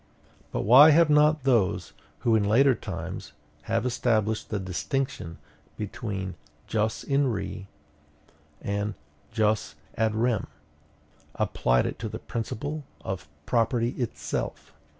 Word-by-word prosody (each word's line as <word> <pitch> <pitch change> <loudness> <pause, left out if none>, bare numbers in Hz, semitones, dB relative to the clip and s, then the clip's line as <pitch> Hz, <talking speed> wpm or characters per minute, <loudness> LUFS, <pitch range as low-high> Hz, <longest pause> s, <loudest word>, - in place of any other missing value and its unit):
But - - -1
why 130 +9 +9
have 160 0 +5
not 150 -1 +4
those, 95 - +1 0.3
who 115 -2 +3
in 110 - +3
later 130 +7 +5
times 85 -9 -6 0.4
have - - +1
established 115 -3 0
the 105 - -1
distinction 90 - -3 0.4
between 100 -2 -4 0.3
jus 110 0 -1
in 140 0 +2
re 100 -2 -5 1.0
and 100 +1 -2 0.4
jus 110 -6 0 0.2
ad 110 -1 +1
rem, 115 -2 +1 0.9
applied - - +1
it - - -4
to 110 - -4
the 110 - -5
principle 130 +7 -4 0.2
of 95 -4 -5 0.2
property 115 +2 +1
itself? 120 -2 -4
110 Hz, 115 wpm, -27 LUFS, 100-125 Hz, 1.0 s, why